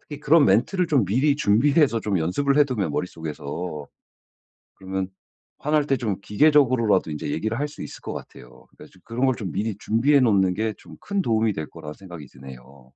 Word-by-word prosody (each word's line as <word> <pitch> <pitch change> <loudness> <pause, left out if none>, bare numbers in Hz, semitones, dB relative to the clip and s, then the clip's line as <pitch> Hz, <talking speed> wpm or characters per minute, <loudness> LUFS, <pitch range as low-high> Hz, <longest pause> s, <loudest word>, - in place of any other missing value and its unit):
특히 145 -1 -10
그런 150 0 +4
멘트를 180 - +2
좀 140 -9 +2
미리 135 +9 +2
준비해서 135 +2 +3
좀 100 -4 -1
연습을 140 - 0
해 150 - +6
두면 105 - -2
머릿속에서 80 -1 -5 0.9
그러면 95 -1 -4 0.5
화날 150 0 +1
때 135 - +2
좀 105 -6 -3
기계적으로라도 125 - +3
인제 75 -1 -5
얘기를 110 +7 -2
할 145 +2 -1
수 145 - -11
있을 - - -10
것 - - -6
같아요. - - -12
그러니까 - - -15
좀 90 - -22
그런 120 +3 -1
걸 130 - +2
좀 100 -6 -5
미리 105 +1 -2
준비해 130 +8 +2
놓는 95 -7 +3
게 110 0 -1
좀 - - -15
큰 200 -1 -2
도움이 110 - +1
될 80 -3 -5
거라 75 -2 -9
생각이 85 -5 -11
드네요. 65 0 -14
110 Hz, 390 characters per minute, -23 LUFS, 90-140 Hz, 0.9 s, 해